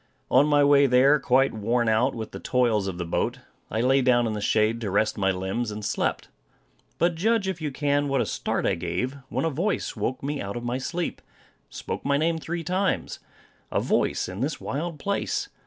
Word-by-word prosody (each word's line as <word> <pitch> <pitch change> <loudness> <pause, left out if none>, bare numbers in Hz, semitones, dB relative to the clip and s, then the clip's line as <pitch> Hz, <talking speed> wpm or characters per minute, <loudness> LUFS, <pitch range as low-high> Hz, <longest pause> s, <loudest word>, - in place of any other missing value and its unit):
On 135 +4 +5
my 145 -1 +4
way 140 0 +5
there, 135 +4 +5
quite 135 +2 +3
worn 115 +2 0
out 115 +5 +2
with 110 -2 -6
the - - -7
toils 115 -6 +1
of 95 -2 -4
the 90 - -3
boat, 85 - -1 0.3
I 110 - -1
lay 135 +2 +4
down 125 -2 +3
in 110 - -1
the 105 - -4
shade 110 +2 +1
to 105 - -2
rest 105 +3 +1
my 95 -2 +1
limbs, 95 +5 -2
and 105 0 -6
slept. - - -1 0.7
But 175 0 +2
judge, 205 +4 +1
if 185 -4 -3
you 155 - -1
can, 145 +1 0
what 135 -1 +1
a 120 - +1
start - - -2
I - - +2
gave, 90 +10 -2
when - - -1
a 165 - 0
voice 185 +8 -1
woke 120 +5 -3
me 145 +1 -2
out 100 +3 -4
of 120 - -6
my 120 +2 -2
sleep, 170 +6 -3 0.5
and - - -23
spoke - - -5
my 140 0 +2
name 165 +2 +1
three 170 +1 -4
times! 185 +4 -1 0.5
A - - +1
voice - - 0
in 90 +2 -7
this 140 +5 -2
wild 160 +3 -4
place! 200 +5 -2
130 Hz, 215 wpm, -25 LUFS, 110-150 Hz, 0.7 s, On